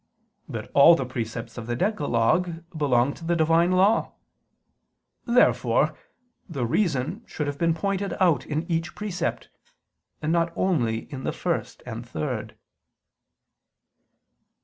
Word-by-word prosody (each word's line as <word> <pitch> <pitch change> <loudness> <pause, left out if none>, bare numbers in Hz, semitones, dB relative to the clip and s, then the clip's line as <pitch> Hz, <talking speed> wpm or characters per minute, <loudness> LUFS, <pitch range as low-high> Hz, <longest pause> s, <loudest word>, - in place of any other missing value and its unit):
But - - -6
all 160 +4 +8
the 135 - -2
precepts 115 -1 -5
of 115 - -8
the 120 - -1
decalogue 165 - 0
belong 140 -3 +2
to - - -13
the 170 +1 +1
Divine 165 +2 +3
law. 195 +5 +3 1.1
Therefore 135 - +3 0.5
the 140 -7 -2
reason 160 - 0
should 150 - -3
have 145 0 -4
been 165 -1 +2
pointed 195 +1 -2
out 170 -8 +3
in 155 +1 -2
each 165 0 -2
precept, 185 -5 -3 0.7
and 155 - -1
not 170 0 +2
only 120 -12 +1
in 130 - -6
the - - -1
first - - -3
and - - -6
third. 75 -1 -4
160 Hz, 125 wpm, -25 LUFS, 125-175 Hz, 1.1 s, all